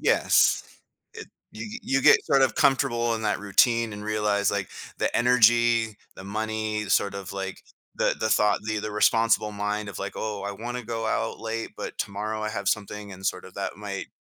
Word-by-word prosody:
Yes. - - +3 0.5
I 445 - -6 0.3
you 220 +2 -7
you 135 0 0
get - - +6
sort 135 -1 +3
of 130 - +2
comfortable 120 -4 +2
in 110 - -4
that 105 -1 0
routine 115 +3 +2
and 105 - -7
realize 105 -1 +1
like 100 -2 -2 0.3
the - - -1
energy, 120 -2 +4 0.2
the 95 - -10
money, 110 +1 -3
sort 100 +1 +2
of 100 -1 -6
like 95 -1 -5 0.3
the - - +1
the 110 - 0
thought, 105 -1 +3
the 110 -1 -3
responsible 105 0 +2
mind 105 +1 -3
of 90 - -8
like, 100 0 -4
"Oh, 105 -2 -4
I 100 - -3
wanna 120 +4 -5
go 115 -1 -3
out 115 - -2
late, 115 0 -4
but - - -7
tomorrow 105 +2 -3
I 105 - -1
have 100 -2 -2
something", 105 -1 -3
and 95 +1 -6
sort 90 - -2
of 95 - -12
that 100 0 -4
might, 100 -2 -5
110 Hz, 190 wpm, -26 LUFS, 100-115 Hz, 0.5 s, get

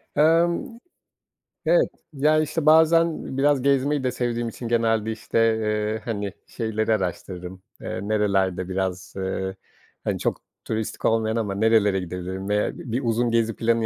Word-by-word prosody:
Emm. 170 +8 +2 0.9
Evet, - - +4 0.2
ya, 150 +2 +3
işte, 155 0 -2
bazen 160 -2 +4
biraz 140 -1 +3
gezmeyi 140 +1 +2
de 125 - +1
sevdiğim 120 -1 -2
için 120 - -7
genelde, 115 -1 +1
işte, 110 +1 -2 0.2
eee, 105 0 -1
hani, 100 -4 -3
şeyleri 110 -1 -1
araştırırım, 90 -1 -4 0.2
eee, - - -4
nerelerde 95 -3 0
biraz, 95 -1 -3
eee, 95 0 -3 0.5
hani, - - -1
çok - - -1 0.2
turistik 110 -1 -3
olmayan 110 0 +2
ama 105 -4 -1
nerelere 105 -2 +3
gidebilirim 90 +2 -5
veya 105 0 0
bi 120 - -8
bir 125 +4 0
uzun 120 0 +1
gezi 115 -1 +1
planı 115 0 +1
110 Hz, 145 wpm, -24 LUFS, 100-130 Hz, 0.9 s, Evet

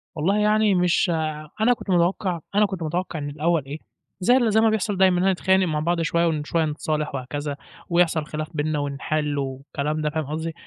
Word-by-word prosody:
والله 175 +6 +1
يعني 210 -1 +3
مش 180 0 +2
ع 155 -1 -3
أنا 240 +3 +5
كنت 225 - -10
متوقّع 180 0 +1 0.2
أنا 210 +1 +5
كنت 190 -4 -4
متوقّع 170 +1 -3
من 145 -1 -4
الأول 155 +1 0
إيه، 140 +3 -6 0.4
زي 245 +8 +4
ال 235 -4 +2
زي 220 +1 +4
ما 225 - +4
بيحصل 215 -2 -1
دايمًا، 185 -1 +4
إنّنا 190 +2 +3
نتخانق 190 +1 +2
مع 155 -2 -1
بعض 170 +2 0
شوية 170 +1 +1
وشوية 160 0 0
نتصالح 150 -1 -2
وهكذا 140 +2 -4 0.3
ويحصَل 170 -3 +2
خلاف 155 +1 -5
بيننا 150 0 -1
ونحل 145 +1 -2
والكلام 140 +3 -3
ده 150 - 0
فاهم 155 0 -3
قصدي؟ 160 +3 -4
165 Hz, 195 wpm, -23 LUFS, 150-185 Hz, 0.4 s, أنا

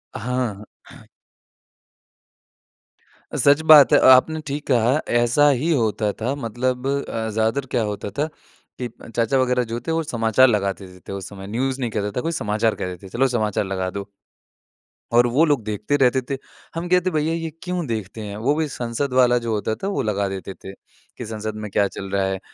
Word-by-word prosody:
हाँ। 120 -4 -3 2.8
सच 145 +2 +5
बात 145 -5 +9
है, - - +7
आपने 145 +5 +5
ठीक 145 +2 -4
कहा 125 +2 +3 0.2
ऐसा 125 +5 +4
ही 145 +5 +1
होता 110 -6 +1
था। 125 +5 0
मतलब 125 +1 -2
अ, 125 -5 -2
ज़्यादातर 110 +5 0
क्या 120 - +1
होता 105 -1 -4
था 150 - +2 0.6
कि 125 - -1 0.3
चाचा 115 +3 +2
वगैरह 125 0 +1
जो 120 - -2
थे - - 0
वो 165 0 0
समाचार 120 -1 +3
लगाते 100 -3 -1 0.2
थे - - -5
उस 100 -1 -6
समय। 95 -1 -9
न्यूज़ 130 +5 -2
नहीं 120 -3 -2
कहता 105 -1 -2
था - - +1
कोई 165 - -2
समाचार 110 +1 +1
कहते 90 +1 -6
थे - - -10
चलो 135 +3 +2
समाचार 110 -5 0
लगा 95 -1 -2
दो। 100 +1 -6 1.0
और 120 +1 +5
वो 135 +7 +3
लोग 145 -7 +1
देखते 105 +5 -2
रहते 130 -1 +3
थे। 135 - -1 0.4
हम 170 +1 -3
कहते 180 0 +3
हैं - - -9
भैया 155 +1 +1
ये 165 -1 -3
क्यों 180 -2 -2
देखते 110 -1 -4
हैं 105 -1 -6
वो 135 +7 +1
भी 160 -1 0
संसद 125 +1 -3
वाला 125 -1 +4
जो 115 - -1
होता 110 +1 -1
था 195 - 0
वो 200 - -1
लगा 100 -2 0
देते 95 0 -6
थे 95 - -11 0.4
कि 120 - -6
संसद 110 -1 -5
में 105 -1 -6
क्या 100 0 +2
चल 95 0 -8
रहा 100 -1 +1
है 95 0 -2
120 Hz, 190 wpm, -22 LUFS, 105-140 Hz, 2.8 s, बात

